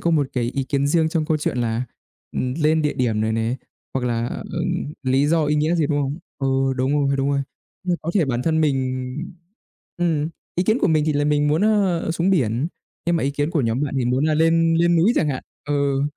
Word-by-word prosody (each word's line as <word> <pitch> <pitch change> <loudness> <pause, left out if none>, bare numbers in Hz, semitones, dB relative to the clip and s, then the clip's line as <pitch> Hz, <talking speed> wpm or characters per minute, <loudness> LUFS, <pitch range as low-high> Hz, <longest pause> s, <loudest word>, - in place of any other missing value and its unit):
có 170 - +1
một 150 -4 +2
cái 125 -2 0
ý 135 -1 -1
kiến 140 +1 0
riêng 160 +1 +2
trong 160 -1 0
câu 155 0 +1
chuyện 145 -4 -2
là, 115 +1 -1 0.5
ừ, - - -4 0.2
lên 155 +1 +3
địa 150 - 0
điểm 115 -4 0
này 110 0 0
nè 115 +3 0 0.4
hoặc 125 -2 0
là, 115 0 0
ờ, - - -5 0.6
lý 135 +2 +2
do 160 0 +2
ý 150 +1 +1
nghĩa 155 +3 +2
gì, 160 -4 +2
đúng 145 -1 0
không? 140 +3 -2 0.2
Ừ, 135 -1 +1
đúng 130 +2 +1
rồi, 140 0 +1
đúng 135 +1 0
rồi, 140 0 +1 0.4
như 180 -1 +1
có 165 - -2
thể 180 -6 +4
bản 125 -2 -1
thân 160 -1 +1
mình 130 -3 0 0.9
ừm, 160 -3 0 0.3
ý 180 - +1
kiến 220 +5 +2
của - - +3
mình 155 -2 +3
thì 155 - +2
là 145 0 +1
mình 150 0 +2
muốn, 155 +6 +2
ờ, 195 -6 +2
xuống 170 +3 +1
biển 130 - +1 0.4
nhưng 170 0 +2
mà - - -1
ý 140 - +1
kiến 145 +2 -1
của 160 -4 +1
nhóm 115 +3 0
bạn 140 -2 -2
thì 125 - 0
muốn 125 +4 +1
là 155 -1 +2
lên 165 +1 +3
lên 170 0 +3
núi 190 +9 +4
chẳng 150 - +2
hạn. 130 - -3 0.3
Ừ, 140 -1 +1
145 Hz, 240 wpm, -22 LUFS, 130-165 Hz, 0.9 s, thể